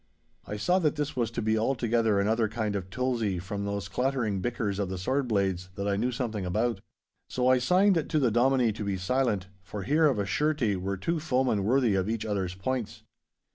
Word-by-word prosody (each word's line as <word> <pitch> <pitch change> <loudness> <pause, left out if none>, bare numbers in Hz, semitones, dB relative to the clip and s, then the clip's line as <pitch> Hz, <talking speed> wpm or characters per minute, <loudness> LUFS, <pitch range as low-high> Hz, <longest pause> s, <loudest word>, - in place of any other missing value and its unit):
I 105 - -4
saw 180 - +2
that 155 -5 +1
this 150 -1 -3
was 120 -3 0
to 115 - -4
be 110 0 +2
altogether 115 -3 +1
another 110 +3 +2
kind 110 -2 -2
of 95 -2 -4
tulzie 115 -4 -1
from 100 +3 -4
those 100 -2 -3
clattering 125 -3 -1
bickers 105 -3 -2
of 100 -2 -1
the 95 - -4
sword 130 +9 0
blades, 95 -4 0
that 100 0 -3
I 100 - +1
knew 120 +5 0
something 115 -5 -3
about. 110 +6 -1 0.5
So 125 0 0
I 130 0 +5
signed 180 +4 +3
to - - +1
the 130 -6 +3
Dominie 125 0 +3
to 105 - -5
be 100 -1 -1
silent, 105 0 0 0.2
for 95 +2 -7
here 155 +6 +3
of 135 -6 +1
a 100 - 0
surety 130 -1 +1
were 95 +1 -3
two 165 - -1
foemen 130 - +1
worthy 125 -1 +3
of 95 +1 0
each 110 0 -2
other's 95 -4 -2
points. 120 +4 -3
110 Hz, 210 wpm, -28 LUFS, 100-130 Hz, 0.5 s, I